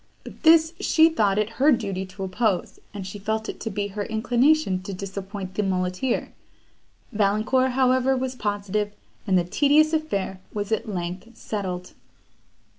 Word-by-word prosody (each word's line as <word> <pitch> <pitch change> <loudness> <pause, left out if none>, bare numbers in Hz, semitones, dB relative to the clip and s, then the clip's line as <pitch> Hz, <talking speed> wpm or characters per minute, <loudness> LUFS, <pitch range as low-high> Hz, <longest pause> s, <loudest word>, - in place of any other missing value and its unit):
But - - -12
this 320 -1 +6
she 320 0 +5
thought 210 -11 +1
it 210 -1 +2
her 295 +2 +6
duty 195 -6 -1
to 195 +1 -8
oppose, 190 0 -1
and 200 -2 -6
she 195 +2 -7
felt 220 +2 -2
it - - -6
to 225 - -4
be 205 0 -3
her 205 +1 -4
inclination 240 -1 +2
to 195 +1 -6
disappoint 195 0 -6
the 210 - 0
muleteer. 185 +5 -1 0.8
Valancourt, 220 +5 +2
however, 260 0 +3
was 260 0 -2
positive, 205 -2 -2 0.3
and 190 -2 +4
the 175 - +3
tedious 295 - +3
affair 200 -12 -2
was 205 0 -3
at 220 0 -1
length 185 +5 -5
settled. 185 -4 -5
210 Hz, 155 wpm, -24 LUFS, 190-255 Hz, 0.8 s, this